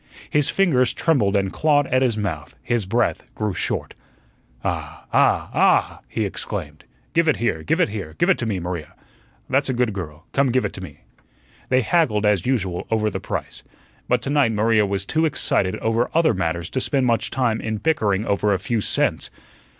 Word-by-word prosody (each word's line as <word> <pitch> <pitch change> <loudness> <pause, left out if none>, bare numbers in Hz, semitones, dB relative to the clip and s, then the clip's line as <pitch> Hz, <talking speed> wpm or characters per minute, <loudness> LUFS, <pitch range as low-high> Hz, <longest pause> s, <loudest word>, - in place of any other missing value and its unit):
His 145 -1 +2
fingers 130 -11 +2
trembled 110 -12 +2
and 95 -1 0
clawed 145 -2 +3
at 130 -1 +1
his 120 -4 +1
mouth; 80 -9 -4
his 120 -5 -1
breath 120 +3 0
grew 105 -2 -1
short. - - -2 0.7
"Ah, - - -4
ah, - - +3
ah!" - - +3
he - - -2
exclaimed, - - -6 0.3
"give 165 0 +3
it 155 - +4
here, 115 -9 -1
give 80 - 0
it - - +3
here; 95 -7 -6
give 175 - +2
it 195 - +3
to 120 - -2
me, 100 -4 -1
Maria. 85 -3 -5 0.5
That's 135 +1 +1
a 130 - 0
good 120 -3 +1
girl, 80 -4 -7
come 140 -1 +3
give 130 +1 +1
it - - -3
to 95 - -7
me." 75 -4 -11 0.7
They 130 0 +4
haggled 110 -6 +2
as 105 -1 +2
usual 95 -9 -1
over 110 -1 +1
the - - -3
price, - - -5 0.5
but 125 -1 +1
to 140 - -2
night 140 -6 +3
Maria 110 0 +3
was 100 0 -2
too 160 +9 +1
excited 100 - 0
over 115 +2 0
other 165 -5 +4
matters 85 -3 -2
to 130 - -1
spend 135 -1 +1
much 115 -2 +1
time 120 -4 0
in 110 -1 -2
bickering 105 -7 +1
over 100 -1 +1
a - - 0
few 110 +4 -1
cents. - - 0
110 Hz, 195 wpm, -22 LUFS, 95-130 Hz, 0.7 s, it